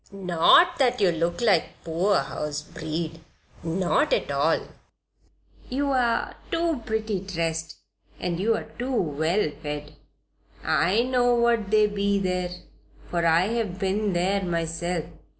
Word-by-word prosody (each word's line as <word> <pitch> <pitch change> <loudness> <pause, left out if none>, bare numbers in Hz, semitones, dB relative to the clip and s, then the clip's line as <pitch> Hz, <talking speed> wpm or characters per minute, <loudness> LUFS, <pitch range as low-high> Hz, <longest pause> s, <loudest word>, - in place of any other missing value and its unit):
"Not 195 - +4
that 250 -2 +2
you 190 -4 +4
look 170 +4 -1
like 220 -5 +1
poorhouse 150 -4 -1
breed 160 +1 -5 0.4
not 175 - +1
at - - 0
all. - - +2 1.1
You're 260 -3 0 0.2
too 330 -5 0
pretty 220 -2 -1
dressed 165 -3 -3 0.4
and 175 -1 -2
you're 220 +3 0
too 250 0 0
well 160 +2 0
fed. 150 0 -5 0.7
I 185 +9 +2
know 245 -1 +2
what 235 -3 +2
they 215 0 +5
be 200 -1 0
there, 180 -2 -1 0.6
for 170 -1 +1
I 170 +4 +3
have 225 -6 -2
been 195 +1 0
there 190 +3 +1
myself. 170 -1 -2
190 Hz, 120 wpm, -25 LUFS, 165-220 Hz, 1.1 s, they